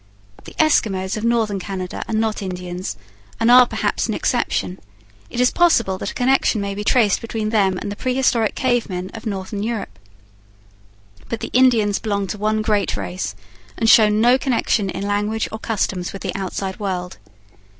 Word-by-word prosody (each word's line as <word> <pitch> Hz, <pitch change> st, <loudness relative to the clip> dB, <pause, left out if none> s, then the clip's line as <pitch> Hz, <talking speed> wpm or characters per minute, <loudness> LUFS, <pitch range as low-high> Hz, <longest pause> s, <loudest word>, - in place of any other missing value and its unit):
The -, -, -11 dB
Eskimos 195 Hz, -11 st, +2 dB
of 215 Hz, -, -5 dB
Northern 225 Hz, -4 st, +1 dB
Canada 185 Hz, -1 st, -5 dB
are 225 Hz, -, -2 dB
not 220 Hz, -1 st, 0 dB
Indians, 180 Hz, -, -5 dB, 0.4 s
and 230 Hz, +1 st, +4 dB
are 250 Hz, 0 st, +8 dB
perhaps -, -, -1 dB
an -, -, -2 dB
exception; 180 Hz, -, -1 dB, 0.5 s
it -, -, -5 dB
is 250 Hz, 0 st, +4 dB
possible 230 Hz, -, +2 dB
that -, -, -3 dB
a -, -, -7 dB
connection 250 Hz, -3 st, +2 dB
may 200 Hz, 0 st, -3 dB
be 205 Hz, +1 st, -4 dB
traced 215 Hz, -3 st, +3 dB
between 225 Hz, -2 st, -3 dB
them 195 Hz, -4 st, +2 dB
and 200 Hz, -, -5 dB
the -, -, -5 dB
prehistoric 250 Hz, -3 st, +1 dB
cave 245 Hz, -3 st, 0 dB
men 180 Hz, 0 st, -5 dB
of 225 Hz, 0 st, -7 dB
Northern 200 Hz, 0 st, -4 dB
Europe. 210 Hz, -, -4 dB, 1.3 s
But 230 Hz, -, -4 dB
the -, -, -5 dB
Indians 230 Hz, -5 st, +4 dB
belong 200 Hz, -2 st, -1 dB
to 210 Hz, -, -4 dB
one 215 Hz, +1 st, 0 dB
great 210 Hz, -2 st, 0 dB
race, 180 Hz, -, -4 dB, 0.4 s
and 225 Hz, -, 0 dB
show 220 Hz, -1 st, +7 dB
no 235 Hz, +5 st, +4 dB
connection 230 Hz, -6 st, 0 dB
in 195 Hz, -, -4 dB
language 205 Hz, +2 st, -1 dB
or 220 Hz, -, -6 dB
customs 190 Hz, -5 st, -2 dB
with 195 Hz, -, -8 dB
the -, -, -3 dB
outside 190 Hz, 0 st, -4 dB
world. 180 Hz, -, -4 dB
210 Hz, 175 wpm, -20 LUFS, 190-230 Hz, 1.3 s, are